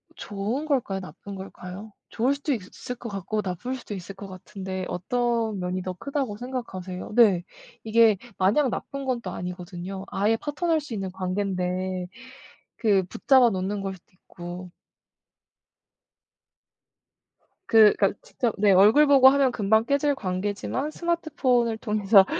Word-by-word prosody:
좋은 210 +8 -3
걸까요, 245 -10 0
나쁜 185 +3 -9
걸까요? 190 +2 -9 0.2
좋을 250 +5 +1
수도 285 +1 -1
있을 245 +3 -6
것 240 -1 -8
같고 200 +2 -3
나쁠 195 +8 -4
수도 245 -4 -8
있을 190 +1 -8
것 200 0 -9
같은데 190 0 -6
어떤 230 +2 -1
면이 180 +1 -2
더 185 0 -4
크다고 265 0 -3
생각하세요? 195 -8 -6
네. 205 -7 +5 0.4
이게 225 -1 +5 0.2
마냥 215 +9 +3
나쁜 275 +3 -5
건 255 -2 -1
또 - - -5
아니거든요. 180 +1 -6
아예 210 +3 +1
파투 295 +7 -3
날 325 -2 +3
수 295 -5 -8
있는 195 -3 -3
관계인데 185 -1 -2 0.7
그 200 -4 +3
붙잡아 255 +5 +4
놓는 195 +1 -2
걸 195 -1 -3
수도 180 - -20
있고. 180 0 -9 3.0
그 220 -2 +7
그러니까 195 -2 +3
직접 235 -4 -2
네 205 0 +4
얼굴 210 +11 +6
보고 270 -2 +8
하면 275 -1 +3
금방 220 0 +2
깨질 285 +2 +2
관계지만 205 +7 -3
스마트폰을 275 -10 0
통해서 210 -3 +4
205 Hz, 290 characters per minute, -25 LUFS, 185-250 Hz, 3.0 s, 보고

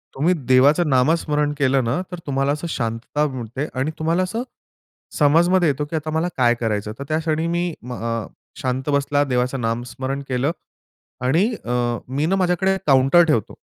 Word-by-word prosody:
तुम्ही 160 +7 +2 0.2
देवाचं 145 +6 +5
नामस्मरण 150 +2 +2
केलं 135 -2 +2
ना, 120 +10 -1
तर 180 - -6
तुम्हाला 135 0 0
असं 150 +3 -3
शांतता 115 +5 -2
मिळते 130 +2 -5
आणि 150 +4 0
तुम्हाला 165 +3 +1
असं 225 +7 -3 0.8
समजमध्ये 170 +3 +4
येतो 145 +2 -1
की 160 - -6
आता 155 0 -3
मला 160 +3 0
काय 120 -2 +4
करायचं 105 -3 -2
आहे. 110 - -9
तर - - -4
त्या 155 +1 +1
क्षणी 160 0 -1
मी 175 0 -1
म 125 +1 -7
अ, 115 -2 -3 0.3
शांत 130 +2 -2
बसला, 145 0 +2
देवाचं 125 -1 -1
नामस्मरण 125 +4 -3
केलं 130 +4 0 0.7
आणि 165 +11 +3 0.2
अ, 120 - -6 0.4
मी 140 +4 -1
ना 195 +3 +1
माझ्याकडे 190 +1 +1
काउंटर 135 +5 +5
ठेवतो. 135 -10 0
145 Hz, 170 wpm, -21 LUFS, 125-165 Hz, 0.8 s, देवाचं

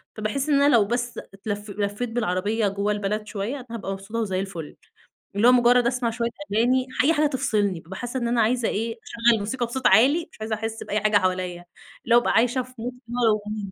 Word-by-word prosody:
فباحس 215 +7 -2
إن 280 -1 +4
أنا 285 +1 +5
لو 215 -3 +5
بس 240 +2 -2 0.2
اتلف 205 +1 -5
لفّيت 205 +4 -3
بالعربية 215 -1 0
جوَّه 200 +1 -1
البلد 210 +1 -2
شوية، 210 +5 -3
أنا 260 -3 -8
هابقى 215 -4 -4
مبسوطة 195 +4 -5
وزي 190 -5 -1
الفُل، 175 -6 -6 0.6
اللي 210 +4 +4
هو - - +8
مُجرّد 245 0 +5
أسمَع 245 -1 0
شوية 235 0 -2 0.2
أغاني، 255 +4 +2 0.2
أي 320 - +5
حاجة 305 -1 +3
تفصِلني 215 - 0
بابقى 180 +4 -10
حاسة 245 +1 -3
إن 235 - -1
أنا 235 0 +2
عايزة 235 +1 +1
إيه، 225 +2 -2
أشغّل 230 -1 +2
موسيقى 240 +5 -2
بصوت 250 +2 0
عالي، 275 - +4
مش - - -17
عايزة 220 0 -2
أحس 225 +1 -5
بأي 210 - -1
حاجة 215 0 +4
حواليا، 185 -2 -2 0.4
اللي 235 - +3
هو - - +8
أبقى - - 0
عايشة 245 +3 +3
في 255 - -16
mood 245 +2 -4 0.2
أنا 215 -4 -1
225 Hz, 210 wpm, -24 LUFS, 205-245 Hz, 0.6 s, هو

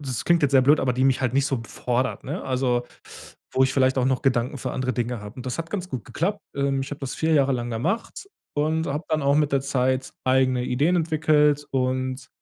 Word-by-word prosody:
das 130 -5 -4
klingt 170 -2 +3
jetzt 140 -1 +2
sehr 130 -1 +6
blöd, 145 +3 +4
aber 125 -1 +1
die 130 +2 +1
mich 135 -1 +3
halt 130 -1 0
nicht 140 0 +3
so 130 -4 -1
fordert, 125 +1 -2
ne? 150 +8 -4
Also, 125 -2 0 0.7
wo 130 - +3
ich 130 0 +2
vielleicht 130 0 +3
auch 125 - +2
noch 130 0 0
Gedanken 130 +1 +1
für 130 - -4
andere 130 0 -2
Dinge 120 0 -2
habe. 105 +2 -9
Und 125 - -8
das 130 +4 -4
hat 165 0 -4
ganz 185 -3 -4
gut 130 -9 -5
geklappt. 200 +6 -2
Ähm, 140 -1 0
ich 135 - -5
habe 145 - -7
das 135 -2 -4
4 160 0 +1
Jahre 140 -2 +3
lang 120 -1 -2
gemacht 170 - -3 0.3
und 160 +2 0
habe 150 +4 -3
dann 155 -2 0
auch 140 +1 +3
mit 150 -1 +2
der 135 - +3
Zeit 130 -1 0
eigene 130 -1 +2
Ideen 150 +9 +1
entwickelt 150 -3 +2
und 130 0 -1
135 Hz, 235 wpm, -24 LUFS, 130-150 Hz, 0.7 s, sehr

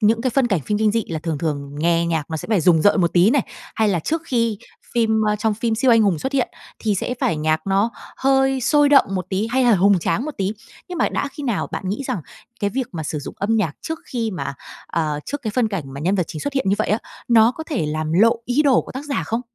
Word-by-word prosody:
những 225 +1 +3
cái 255 - +1
phân 260 0 +2
cảnh 195 -8 +1
phim 205 +9 -2
kinh 215 -1 +2
dị, 225 -2 0
là 160 -2 -3
thường 160 -2 -3
thường 145 -3 -3
nghe 170 +1 +2
nhạc 160 -2 -2
nó 160 - -2
sẽ - - -7
phải 210 -6 +2
rùng 165 -2 +4
rợn 205 -1 +4
một 170 -2 +1
tí 180 +5 +5
này. 275 -2 +3 0.3
Hay 220 -2 +2
là 180 -4 +1
trước 325 - -2
khi 230 -6 0 0.4
phim 220 -2 +2 0.2
trong 220 0 +1
phim 225 +1 -1
siêu 245 +3 +2
anh 230 -1 +6
hùng 195 -7 +2
xuất 265 - -3
hiện 265 -3 +1 0.3
thì 215 -2 0
sẽ 245 +6 -2
phải 165 - +1
nhạc 155 +2 0
nó 195 +4 +2 0.3
hơi 270 0 +2
sôi 290 +3 +4
động 280 -1 +6
một 185 -2 -2
tí 200 +3 -1
hay 260 +2 +2
hà 235 -3 +5
hùng 195 +1 +4
tráng 170 - -1
một 305 - -3
tí. 195 +1 0 0.4
Nhưng 360 -2 -5
mà - - +2
đã 285 - -2
khi 295 - -8
nào 235 -7 -1
bạn 190 - -4
nghĩ 205 +8 -2
rằng 180 - -2 0.4
cái 205 0 0
việc 255 +2 -2
mà 160 - -4
sử 150 0 -3
dụng 145 - -7
âm 225 +3 +1
nhạc 170 -9 0
trước 320 0 -4
khi 230 -3 -2
mà, 180 -6 -4 0.3
ờ, 155 -3 -2
trước 285 -1 -4
cái 220 - -2
phân 230 0 +1
cảnh 195 -7 -3
mà 140 - -6
nhân 180 +6 +1
vật 180 -4 +1
chính 155 - -6
xuất 285 - -3
hiện 270 -7 0
như 200 - +4
vậy 215 - 0
á, 215 - +2 0.3
nó 230 0 +5
có 320 +4 -7
thể 260 - -2
làm 155 +1 -2
lộ 225 +7 +5
ý 255 +5 +2
đồ 275 -4 +4
của - - -11
tác 265 +3 -6
giả 290 -2 -2
không? 230 +2 -1
215 Hz, 280 wpm, -21 LUFS, 170-250 Hz, 0.4 s, anh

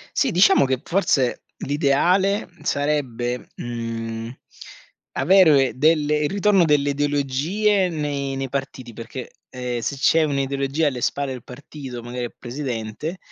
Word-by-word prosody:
Sì, 270 -5 +2
diciamo 190 -4 +5
che 130 -1 0
forse 150 -9 +1 0.2
l'ideale 175 +8 +1
sarebbe, 130 -5 -1
mhmm, 115 -1 -5 0.8
avere 150 -3 +5
delle 150 +1 +3
il 150 -1 0
ritorno 200 -2 +3
delle 145 -2 +2
ideologie, 145 +8 +1
nei 145 -4 -3
nei 135 0 -3
partiti, 130 -3 -5
perché, 115 +3 -8 0.2
ehm, 125 -1 -4
se 130 +5 -2
c'è 160 +4 +4
un'ideologia 140 +1 0
alle 130 -4 -2
spalle 140 +1 -1
del 125 -3 -9
partito, 135 -1 -9
magari 120 +1 -4
al 120 - -9
presidente, 125 - -5
140 Hz, 125 wpm, -22 LUFS, 125-155 Hz, 0.8 s, diciamo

